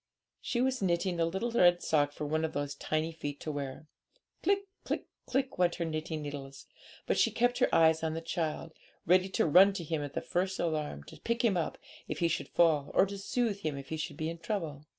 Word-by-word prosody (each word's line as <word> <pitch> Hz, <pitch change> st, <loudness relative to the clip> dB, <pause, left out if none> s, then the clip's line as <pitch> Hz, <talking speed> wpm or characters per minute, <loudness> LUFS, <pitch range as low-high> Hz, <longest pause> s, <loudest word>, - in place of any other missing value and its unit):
She 240 Hz, -, -1 dB
was 260 Hz, -1 st, +1 dB
knitting 175 Hz, -1 st, 0 dB
a 165 Hz, -, +3 dB
little 190 Hz, +8 st, -2 dB
red 175 Hz, -6 st, +4 dB
sock 145 Hz, -2 st, +2 dB
for 150 Hz, -, -5 dB
one 155 Hz, +2 st, 0 dB
of 160 Hz, -, -2 dB
those 145 Hz, 0 st, -2 dB
tiny 155 Hz, +3 st, -1 dB
feet 145 Hz, -3 st, -6 dB
to 155 Hz, -, -3 dB
wear. 140 Hz, 0 st, -5 dB, 0.6 s
Click! 395 Hz, +2 st, +2 dB, 0.2 s
click! -, -, -2 dB, 0.2 s
click! 265 Hz, -5 st, -1 dB
went 175 Hz, -1 st, +3 dB
her 170 Hz, -, -2 dB
knitting 155 Hz, -1 st, -3 dB
needles; 140 Hz, -2 st, -7 dB, 0.4 s
but -, -, +1 dB
she -, -, +5 dB
kept 245 Hz, +1 st, +1 dB
her 255 Hz, -, +4 dB
eyes 160 Hz, -1 st, +5 dB
on 160 Hz, 0 st, -1 dB
the 165 Hz, -, -3 dB
child, 165 Hz, -1 st, -3 dB, 0.3 s
ready 185 Hz, +2 st, +4 dB
to -, -, +1 dB
run 185 Hz, +6 st, +7 dB
to 185 Hz, -, -4 dB
him 160 Hz, -1 st, -2 dB
at 145 Hz, -1 st, -5 dB
the -, -, +1 dB
first 185 Hz, +1 st, -1 dB
alarm, 155 Hz, -, -2 dB
to -, -, -13 dB
pick 235 Hz, +1 st, 0 dB
him 210 Hz, -5 st, +3 dB
up 170 Hz, -3 st, -1 dB, 0.3 s
if -, -, -3 dB
he 170 Hz, -, +2 dB
should 165 Hz, -, -2 dB
fall, 155 Hz, -4 st, +3 dB
or -, -, +6 dB
to 200 Hz, 0 st, -6 dB
soothe 215 Hz, 0 st, -1 dB
him 155 Hz, -7 st, -3 dB
if 135 Hz, -1 st, -8 dB
he 160 Hz, -, -3 dB
should 150 Hz, -2 st, -4 dB
be 160 Hz, -1 st, -2 dB
in 170 Hz, -, -8 dB
trouble. 165 Hz, -5 st, -4 dB
165 Hz, 230 wpm, -31 LUFS, 150-190 Hz, 0.6 s, run